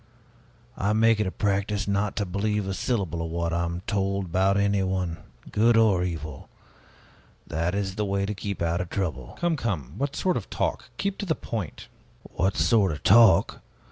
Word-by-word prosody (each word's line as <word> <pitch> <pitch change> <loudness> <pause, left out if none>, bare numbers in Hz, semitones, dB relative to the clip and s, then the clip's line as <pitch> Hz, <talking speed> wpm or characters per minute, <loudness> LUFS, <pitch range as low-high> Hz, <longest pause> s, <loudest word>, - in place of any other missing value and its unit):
I 100 +2 +1
make 115 0 +4
it 105 - +1
a - - -2
practice 100 0 -1
not 100 0 0
to 105 - -1
believe 100 +2 -1
a 95 - -2
syllable 95 - -1
of 80 - -4
what 85 0 -2
I 85 0 0
am 85 +1 -4
told 100 -1 -1
about 95 +3 +2
anyone, 95 -4 0 0.3
good 115 +2 +4
or 105 -6 +4
evil; 80 -5 -5 1.0
that 85 +4 -1
is 100 -2 -1
the 105 +2 -2
way 100 0 0
to 105 - -2
keep 100 -2 -4
out 85 +1 0
of 90 - -5
trouble." 75 -11 -4
"Come, 175 -1 +1
come, 90 - -3
what 140 +1 -1
sort 185 -1 +1
of 115 - -6
talk? - - -2
Keep 200 0 -2
to 200 - -4
the 160 - +1
point." 100 - -5 0.4
"What 95 +3 -1
sort 105 -6 +3
of 75 - -6
talk? 100 -4 +5
100 Hz, 185 wpm, -26 LUFS, 85-105 Hz, 1.0 s, talk